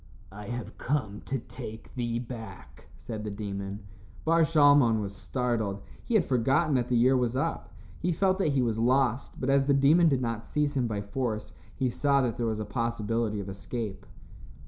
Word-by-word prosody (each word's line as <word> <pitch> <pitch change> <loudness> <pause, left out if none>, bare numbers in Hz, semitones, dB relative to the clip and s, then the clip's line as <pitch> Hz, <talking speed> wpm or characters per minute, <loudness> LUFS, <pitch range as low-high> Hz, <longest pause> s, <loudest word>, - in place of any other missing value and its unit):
"I 105 +1 -9
have 120 0 -6
come 110 -8 -2
to 135 - -1
take 110 -2 -9
thee 120 -2 -2
back," 110 - -9
said 110 -2 -6
the 105 - -3
demon. 100 0 -5 0.4
Bar 165 +1 +4
Shalmon 145 -7 +5
was 100 -1 -4
startled. 110 -4 -2 0.2
He 235 - -1
had 200 - +4
forgotten 135 +5 +2
that 125 -2 +1
the 125 - +2
year 130 +3 +5
was 125 -1 +1
up. 165 +5 -2 0.3
He 180 - 0
felt 190 +3 +1
that 155 -7 +2
he 130 -2 +2
was 115 -2 0
lost, 125 +1 +1
but 135 +1 0
as 135 0 +4
the 140 0 +3
demon 155 +5 +5
did 135 -3 +2
not 115 -2 -2
seize 150 -1 0
him 125 -3 +1
by 105 -3 -2
force, 110 +1 -3 0.2
he 130 -2 0
saw 140 +2 +2
that 120 -3 -1
there 120 - 0
was 110 -1 -1
a 110 - -3
possibility 115 -2 -1
of 100 - -5
escape. 100 +2 -5
120 Hz, 190 wpm, -28 LUFS, 110-140 Hz, 0.4 s, Shalmon